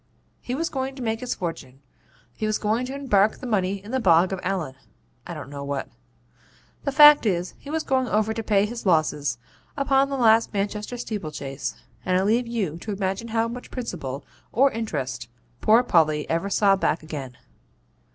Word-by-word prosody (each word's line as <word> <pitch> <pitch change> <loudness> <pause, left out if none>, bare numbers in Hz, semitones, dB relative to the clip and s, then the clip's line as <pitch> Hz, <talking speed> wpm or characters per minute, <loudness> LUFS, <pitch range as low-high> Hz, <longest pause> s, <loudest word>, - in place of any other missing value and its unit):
He 250 - -3
was 330 +4 -1
going 265 -2 -3
to 260 - -6
make 225 -1 -1
his 250 0 -3
fortune; 135 -7 -6 0.5
he 215 - -3
was 215 - +1
going 225 +4 0
to 265 - -5
embark 215 -7 +2
the - - -9
money 200 -5 0
in 210 - -9
the 260 - +1
Bog 180 -3 +4
of 190 - -3
Allen 180 -7 -2 0.5
I - - -6
don't 140 - -8
know 140 -1 -6
what. 140 -1 -3 1.0
The 280 - +1
fact 295 -3 +8
is, 180 -2 -1
he 280 - -11
was 320 +1 -1
going 260 -1 +1
to 220 +1 0
pay 205 -2 +3
his 230 -1 -5
losses 150 -6 +1 0.4
upon 275 -1 +3
the 275 - -2
last 225 -2 +4
Manchester 210 +4 -2
steeple 210 -8 -4
chase, 135 -2 -5 0.3
and 185 0 +1
I 185 - +2
leave 230 +4 +2
you 200 -9 -2
to 215 - -5
imagine 195 +2 -2
how 225 0 0
much 245 +2 -8
principal 155 - -5 0.3
or 270 +4 +4
interest 135 - -4 0.3
poor 225 +3 +5
Polly 155 -8 +2
ever 165 +4 0
saw 200 -1 +4
back 165 -4 0
again. 135 -6 -7
210 Hz, 185 wpm, -24 LUFS, 165-245 Hz, 1.0 s, fact